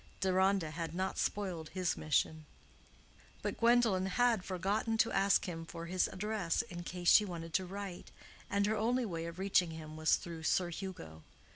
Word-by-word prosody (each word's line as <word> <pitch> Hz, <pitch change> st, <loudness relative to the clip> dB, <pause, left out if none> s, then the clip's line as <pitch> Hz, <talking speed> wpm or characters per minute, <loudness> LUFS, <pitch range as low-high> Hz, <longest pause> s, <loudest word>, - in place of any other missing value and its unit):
Deronda 190 Hz, -3 st, +2 dB
had 165 Hz, 0 st, -5 dB
not 190 Hz, +1 st, -2 dB
spoiled 180 Hz, -6 st, -2 dB
his 185 Hz, -2 st, 0 dB
mission. 155 Hz, +1 st, 0 dB, 1.0 s
But -, -, -3 dB
Gwendolen 230 Hz, -5 st, +4 dB
had 230 Hz, 0 st, +2 dB
forgotten 200 Hz, +5 st, -1 dB
to 225 Hz, -, +3 dB
ask 195 Hz, 0 st, +3 dB
him 165 Hz, -3 st, -5 dB
for 165 Hz, +1 st, -7 dB
his 180 Hz, +1 st, +1 dB
address 205 Hz, -2 st, -1 dB
in 180 Hz, -7 st, -8 dB
case 175 Hz, 0 st, -5 dB
she 210 Hz, -, +8 dB
wanted 165 Hz, -4 st, -6 dB
to 185 Hz, -1 st, +1 dB
write, 195 Hz, -1 st, -7 dB, 0.4 s
and 200 Hz, 0 st, +2 dB
her 215 Hz, +1 st, +1 dB
only 240 Hz, +4 st, +1 dB
way 165 Hz, -5 st, -4 dB
of 170 Hz, +1 st, -8 dB
reaching 190 Hz, -2 st, +2 dB
him 155 Hz, -1 st, -8 dB
was 155 Hz, 0 st, +4 dB
through 165 Hz, -2 st, -7 dB
Sir 175 Hz, +2 st, +1 dB
Hugo. 160 Hz, -, -7 dB
185 Hz, 170 wpm, -34 LUFS, 165-200 Hz, 1.0 s, she